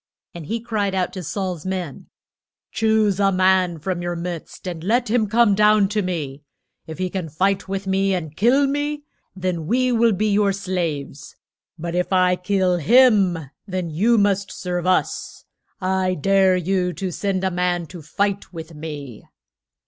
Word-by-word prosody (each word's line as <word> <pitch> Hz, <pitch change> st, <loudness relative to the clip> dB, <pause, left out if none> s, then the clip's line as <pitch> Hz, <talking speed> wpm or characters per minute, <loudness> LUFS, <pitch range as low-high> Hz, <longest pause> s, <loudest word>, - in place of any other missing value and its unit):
And 170 Hz, -4 st, -9 dB
he 230 Hz, +5 st, -2 dB
cried 215 Hz, -4 st, -2 dB
out 185 Hz, -1 st, -1 dB
to 185 Hz, -, -5 dB
Saul's 180 Hz, 0 st, -4 dB
men, 185 Hz, -6 st, -5 dB, 0.6 s
Choose 220 Hz, -3 st, +2 dB
a 195 Hz, -1 st, +3 dB
man 185 Hz, -2 st, +2 dB
from 175 Hz, +3 st, -3 dB
your 175 Hz, 0 st, -3 dB
midst 170 Hz, +1 st, -6 dB
and 170 Hz, -3 st, -5 dB
let 230 Hz, +3 st, +1 dB
him 225 Hz, -3 st, +2 dB
come 225 Hz, 0 st, +4 dB
down 210 Hz, -1 st, +4 dB
to 210 Hz, 0 st, 0 dB
me. 155 Hz, -7 st, -4 dB, 0.5 s
If 160 Hz, -, -7 dB
he 185 Hz, 0 st, -1 dB
can 180 Hz, -3 st, -4 dB
fight 190 Hz, +6 st, 0 dB
with 195 Hz, 0 st, -4 dB
me 195 Hz, 0 st, +1 dB
and 160 Hz, -4 st, -5 dB
kill 250 Hz, -, +4 dB
me, 290 Hz, +1 st, -2 dB, 0.3 s
then 180 Hz, -4 st, -3 dB
we 255 Hz, +4 st, +2 dB
will 230 Hz, -1 st, +3 dB
be 205 Hz, +3 st, 0 dB
your 200 Hz, -1 st, +2 dB
slaves. 170 Hz, -8 st, -4 dB, 0.4 s
But 170 Hz, +1 st, -5 dB
if 180 Hz, +2 st, -1 dB
I 180 Hz, -1 st, +4 dB
kill 180 Hz, -1 st, +1 dB
him 190 Hz, -, +4 dB, 0.2 s
then 185 Hz, -3 st, -3 dB
you 220 Hz, +9 st, +3 dB
must 200 Hz, -1 st, +1 dB
serve 180 Hz, -1 st, -3 dB
us. 185 Hz, -, -1 dB, 0.3 s
I 185 Hz, 0 st, 0 dB
dare 190 Hz, +3 st, +3 dB
you 180 Hz, 0 st, 0 dB
to 190 Hz, 0 st, -4 dB
send 190 Hz, +1 st, -2 dB
a 190 Hz, -, +1 dB
man 175 Hz, -1 st, 0 dB
to 175 Hz, +1 st, -10 dB
fight 200 Hz, +6 st, -2 dB
with 165 Hz, -2 st, -9 dB
me. 150 Hz, -6 st, -8 dB
185 Hz, 170 wpm, -21 LUFS, 175-200 Hz, 0.6 s, come